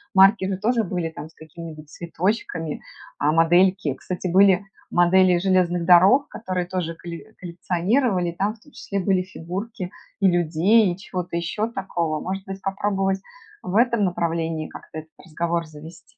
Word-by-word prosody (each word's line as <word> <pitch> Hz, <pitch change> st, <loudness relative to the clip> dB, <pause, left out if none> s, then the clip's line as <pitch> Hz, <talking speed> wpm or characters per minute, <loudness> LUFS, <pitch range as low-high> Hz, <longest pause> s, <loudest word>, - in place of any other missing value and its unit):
марки 195 Hz, +1 st, +6 dB
же 195 Hz, -, -2 dB
тоже 230 Hz, +4 st, +1 dB
были 175 Hz, -3 st, -3 dB
там 155 Hz, -1 st, -9 dB
с -, -, -24 dB
какими-нибудь 160 Hz, -1 st, -11 dB
цветочками, 170 Hz, -2 st, -3 dB, 0.4 s
а 145 Hz, +1 st, +2 dB
модельки, 175 Hz, 0 st, +3 dB
кстати, 180 Hz, +6 st, -5 dB
были 190 Hz, +1 st, +4 dB, 0.2 s
модели 180 Hz, +1 st, +4 dB
железных 175 Hz, -2 st, +1 dB
дорог, 190 Hz, +10 st, +6 dB
которые 185 Hz, -5 st, -3 dB
тоже 175 Hz, -2 st, -3 dB
коле 175 Hz, +5 st, -9 dB
коллекционировали. 180 Hz, +3 st, 0 dB
Там 200 Hz, +5 st, -2 dB
в 225 Hz, -, -25 dB
том 295 Hz, -, -20 dB
числе 200 Hz, -7 st, -4 dB
были 190 Hz, 0 st, +1 dB
фигурки 185 Hz, +2 st, -6 dB, 0.3 s
и 195 Hz, -, +4 dB
людей, 175 Hz, +4 st, +3 dB
и 175 Hz, -, -6 dB
чего-то 180 Hz, -3 st, -5 dB
еще 210 Hz, +7 st, -2 dB
такого. 170 Hz, -7 st, -2 dB
Может 190 Hz, +4 st, -4 dB
быть 195 Hz, 0 st, -7 dB
попробовать 195 Hz, -1 st, -1 dB, 0.4 s
в 180 Hz, -, -5 dB
этом 235 Hz, -1 st, +3 dB
направлении 165 Hz, -3 st, -2 dB
как-то 160 Hz, -, -9 dB
этот 155 Hz, 0 st, -13 dB
разговор 170 Hz, 0 st, -2 dB
завести? 155 Hz, +2 st, -14 dB
180 Hz, 150 wpm, -23 LUFS, 170-195 Hz, 0.4 s, марки